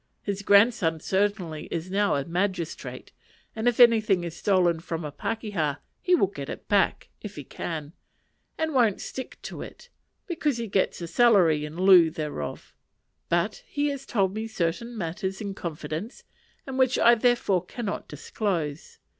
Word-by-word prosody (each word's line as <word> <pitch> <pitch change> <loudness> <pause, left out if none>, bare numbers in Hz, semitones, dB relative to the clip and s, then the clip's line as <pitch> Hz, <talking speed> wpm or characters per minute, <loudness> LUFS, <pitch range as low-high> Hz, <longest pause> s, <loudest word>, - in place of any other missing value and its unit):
His 200 -1 -3
grandson 200 -5 +4
certainly 190 -4 -1
is 170 +2 -4
now 205 -2 +2
a 140 -1 -1
magistrate, 175 0 -3 0.4
and 220 +2 -1
if 245 0 +2
anything 220 -6 +5
is 170 -1 -5
stolen 180 -4 +2
from 165 -1 -5
a 150 - -5
pakeha, 200 -7 -2 0.3
he 360 -1 +4
will 335 - +4
get 150 -7 -7
it - - -7
back, 200 -2 +1
if 205 -2 -8
he 145 - -7
can, 155 +2 -6 0.6
and 320 -1 -1
won't 235 -7 +3
stick 260 - -7
to - - -7
it, - - -11 0.4
because 305 -7 -1
he 235 - -3
gets 195 -3 0
a - - -4
salary 175 -7 +4
in 150 +1 -8
lieu 185 -3 +7
thereof; 155 -2 -5 0.6
but - - 0
he 290 -1 0
has 275 -1 -5
told 195 -5 +1
me 220 +1 -3
certain 220 +4 -2
matters 190 +1 -3
in 200 -2 -4
confidence, 165 - -6 0.4
and 265 -1 -5
which 255 -1 +3
I 235 - +6
therefore 235 -6 +2
cannot 210 +2 -5
disclose. 165 -8 -3
195 Hz, 160 wpm, -26 LUFS, 165-230 Hz, 0.6 s, lieu